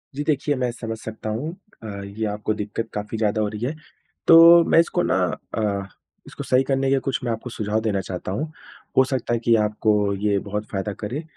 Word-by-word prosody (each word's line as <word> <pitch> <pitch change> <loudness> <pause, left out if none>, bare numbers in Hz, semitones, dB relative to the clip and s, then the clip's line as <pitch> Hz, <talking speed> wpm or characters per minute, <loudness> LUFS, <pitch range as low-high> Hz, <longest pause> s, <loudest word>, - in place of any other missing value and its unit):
जी 145 - -2
देखिए, 145 -1 +1
मैं 125 -1 -1
समझ 115 -1 -6
सकता 110 0 -6
हूँ। 125 +9 -3 0.3
अ, 110 - -6 0.2
ये 105 +3 -4
आपको 105 +1 -2
दिक़्क़त 105 +2 -4
काफ़ी 105 +2 -4
ज़्यादा 110 0 +1
हो 105 - +1
रही 105 +3 -4
है 145 +5 -2 0.5
तो 170 +1 +9
मैं - - +6
इसको 170 +1 +2
ना - - +1 0.4
अ, 100 -3 0 0.4
इसको - - -7
सही 130 +1 +3
करने 135 0 0
के 135 - +3
कुछ 130 -4 0
मैं 120 - -1
आपको 115 +2 -4
सुझाव 110 -1 -1
देना 105 -3 0
चाहता 90 0 -5
हूँ। 150 +10 -3 0.5
हो 130 - +8
सकता 130 -3 -2
है 120 - +1
कि 115 -1 +5
आपको 105 -1 +1
ये 100 0 +1
बहुत 105 +1 -3
फ़ायदा 100 +1 -2
करे। 125 +9 -4
110 Hz, 210 wpm, -23 LUFS, 105-130 Hz, 0.5 s, तो